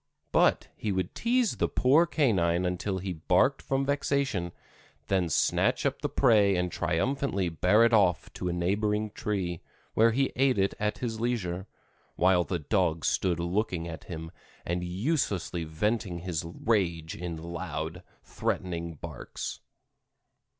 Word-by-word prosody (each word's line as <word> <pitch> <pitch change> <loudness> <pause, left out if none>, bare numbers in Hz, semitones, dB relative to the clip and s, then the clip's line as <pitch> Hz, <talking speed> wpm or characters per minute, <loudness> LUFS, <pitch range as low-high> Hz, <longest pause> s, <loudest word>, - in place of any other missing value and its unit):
But - - +3
he 105 - -2
would 95 -2 -2
tease 240 -1 +1
the - - +2
poor 150 +7 +4
canine 95 - +2
until 90 +2 -1
he 95 0 -3
barked 90 - +2
from 135 0 0
vexation, 140 -10 0 0.6
then 95 -3 +2
snatch - - +2
up - - 0
the - - -1
prey 100 -4 +4
and 90 0 0
triumphantly 100 +2 0
bear 90 +8 +4
it 115 0 +4
off 95 -5 +3
to 90 - -3
a - - 0
neighboring 105 +4 0
tree, 95 -6 -3 0.3
where 115 +1 +5
he 135 +4 +1
ate 130 -2 +3
it 95 0 +2
at 105 0 -1
his 115 -3 -3
leisure, 100 -6 -2 0.5
while 90 0 +4
the 90 +1 -2
dog 85 0 0
stood 90 -3 +1
looking 85 -1 -1
at 80 -1 -8
him 80 -1 -7 0.3
and 90 +1 -1
uselessly 95 - -1
venting 95 +3 -1
his 85 -3 -3 0.2
rage 85 -8 +1
in 85 -1 -5
loud, 85 0 -5 0.2
threatening 85 -2 -3
barks. - - -6
95 Hz, 145 wpm, -28 LUFS, 85-110 Hz, 0.6 s, where